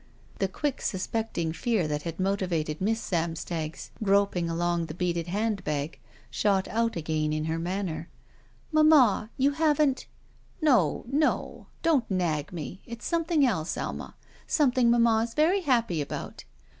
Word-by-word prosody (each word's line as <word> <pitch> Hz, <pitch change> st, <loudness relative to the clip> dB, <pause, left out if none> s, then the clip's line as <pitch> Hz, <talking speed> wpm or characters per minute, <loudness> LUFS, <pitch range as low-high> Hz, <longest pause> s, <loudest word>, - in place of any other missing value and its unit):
The 195 Hz, -, +2 dB
quick 275 Hz, +9 st, -3 dB
suspecting 190 Hz, -4 st, -2 dB
fear 215 Hz, -3 st, 0 dB
that 150 Hz, 0 st, -2 dB
had 165 Hz, +2 st, -6 dB
motivated 180 Hz, -5 st, -1 dB
Miss 225 Hz, +4 st, +1 dB
Samstag's 165 Hz, -3 st, -3 dB
groping 200 Hz, -4 st, +2 dB
along 170 Hz, 0 st, 0 dB
the 155 Hz, -, -7 dB
beaded 175 Hz, -2 st, -1 dB
hand 205 Hz, +1 st, -1 dB
bag 150 Hz, 0 st, -3 dB, 0.3 s
shot 195 Hz, -2 st, +1 dB
out 230 Hz, 0 st, 0 dB
again 155 Hz, -2 st, -1 dB
in 155 Hz, 0 st, -1 dB
her 160 Hz, +1 st, -1 dB
manner. 170 Hz, -2 st, -3 dB, 0.6 s
"Mamma 300 Hz, -9 st, +5 dB
— -, -, -33 dB
you 275 Hz, +2 st, +3 dB
haven't 295 Hz, -3 st, +2 dB, 0.2 s
— -, -, -33 dB
?" -, -, -33 dB
"No, 250 Hz, -, +3 dB
no! 295 Hz, +4 st, 0 dB, 0.2 s
Don't 300 Hz, -8 st, +2 dB
nag 165 Hz, -6 st, -1 dB
me. 175 Hz, +2 st, -6 dB
It's 235 Hz, 0 st, -8 dB
something 330 Hz, -3 st, +2 dB
else, 185 Hz, -10 st, -1 dB
Alma. -, -, -5 dB, 0.3 s
Something 255 Hz, -5 st, +3 dB
mamma 235 Hz, -1 st, +4 dB
is 230 Hz, -, -14 dB
very 340 Hz, +6 st, +3 dB
happy 235 Hz, -, +1 dB
about." 140 Hz, -, -6 dB
195 Hz, 150 wpm, -27 LUFS, 165-245 Hz, 0.6 s, Mamma